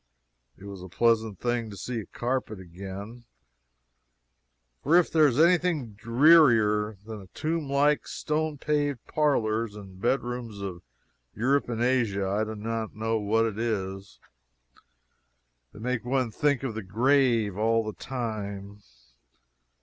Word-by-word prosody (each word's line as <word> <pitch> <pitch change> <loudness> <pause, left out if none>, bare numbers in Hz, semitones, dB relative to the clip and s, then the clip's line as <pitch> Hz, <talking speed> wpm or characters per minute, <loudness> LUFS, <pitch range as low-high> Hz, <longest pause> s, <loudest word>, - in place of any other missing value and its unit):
It - - -16
was 100 -2 -8
a 95 - -9
pleasant 110 0 +1
thing 120 -2 -1
to 100 - -9
see 120 +5 -4
a 105 - -7
carpet 120 -4 -3
again, 100 +6 -9 1.6
for 155 +5 +3
if 180 - +3
there 155 -2 +5
is 130 0 0
any 170 +2 +6
thing 155 -10 -2
drearier 115 -3 +4
than 110 -1 -7
the 95 - -12
tomb 155 -2 -2
like, 145 +1 +2
stone 155 -1 -2
paved 145 -3 -1
parlors 115 -7 0
and 95 -2 -11
bed 130 +4 +1
rooms 120 -4 -6
of 95 -3 -6 0.5
Europe 135 +4 +1
and 115 0 -1
Asia, 115 -6 +1
I 100 +3 0
do 110 0 -6
not 110 +1 -4
know 110 +1 -1
what 110 +2 +2
it 110 -1 -3
is. 95 -4 -3 1.5
They - - -15
make 120 +1 -2
one 125 -1 0
think 140 +3 +1
of 130 -4 -2
the 110 - -4
grave 115 0 +2
all 115 +2 +2
the 110 -1 -5
time. 105 -5 -5
115 Hz, 145 wpm, -27 LUFS, 105-130 Hz, 1.6 s, any